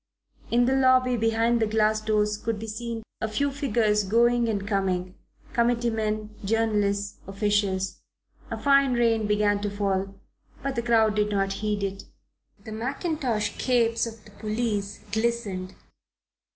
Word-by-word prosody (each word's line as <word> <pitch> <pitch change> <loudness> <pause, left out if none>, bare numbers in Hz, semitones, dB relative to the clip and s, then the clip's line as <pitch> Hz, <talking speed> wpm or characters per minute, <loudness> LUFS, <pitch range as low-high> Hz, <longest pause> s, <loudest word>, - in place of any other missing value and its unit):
In 240 +1 +3
the 260 - +2
lobby 255 -1 +4
behind 225 +1 +2
the 220 - +2
glass 215 0 +2
doors 210 -1 +1
could 225 +1 -3
be 220 - -6
seen 225 +1 -5 0.2
a 220 - 0
few 280 +7 0
figures 225 -7 +1
going 235 +3 +3
and 200 -2 -2
coming, 185 -3 -1 0.4
committee 235 -1 +2
men, 215 -1 -2
journalists, 205 -2 0
officials. 195 -1 0 0.5
A - - -3
fine 275 -2 +4
rain 230 -3 +2
began 205 -1 +2
to 205 - -1
fall, 195 -1 -1 0.5
but 275 -1 -2
the 235 - 0
crowd 225 -2 +3
did 210 0 +1
not 195 -1 0
heed 210 -1 -1
it. 195 0 -4 0.6
The 220 - -7
mackintosh 250 -1 -2
capes 235 -2 +2
of 225 -1 -10
the 210 - -15
policemen 210 -1 -2
glistened. 220 -5 -2
220 Hz, 145 wpm, -26 LUFS, 205-235 Hz, 0.6 s, lobby